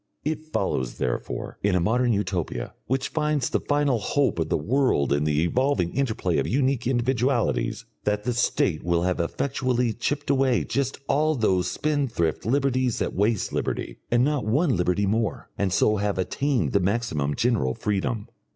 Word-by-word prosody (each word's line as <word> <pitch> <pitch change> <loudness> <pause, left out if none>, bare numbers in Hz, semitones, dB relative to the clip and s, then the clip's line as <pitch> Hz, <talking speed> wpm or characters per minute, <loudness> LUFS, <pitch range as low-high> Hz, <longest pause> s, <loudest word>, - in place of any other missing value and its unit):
It 155 +1 -2
follows, 65 - -2
therefore, 60 - -3
in 100 -2 +2
a - - +3
modern 120 +7 +2
Utopia, 90 - -2
which 130 +1 0
finds 150 -4 0
the - - +2
final 145 -4 +1
hope 140 - 0
of 80 -1 -1
the - - +2
world 105 - +1
in 70 +1 +1
the 75 +1 +2
evolving 95 -2 +1
interplay 110 -10 0
of - - -1
unique 130 -1 +1
individualities, 125 0 0 0.2
that 105 0 0
the 125 - 0
State 100 -8 +1
will 85 0 +1
have 90 0 0
effectually 125 +5 0
chipped 145 +5 -1
away 130 -3 +2
just 135 -1 -1
all 155 +2 +2
those 95 -7 +1
spendthrift 130 - -1
liberties 130 -2 +1
that - - -2
waste 105 +1 0
liberty, - - -3
and 120 +1 +3
not 145 -1 +1
one 135 +6 +2
liberty 90 +3 +1
more, 110 +2 -1
and 100 -2 0
so 105 +3 +3
have 100 -1 -1
attained 135 +8 0
the 100 - +3
maximum 90 -8 0
general 110 - +1
freedom. 105 +1 -2
115 Hz, 165 wpm, -25 LUFS, 90-135 Hz, 0.2 s, a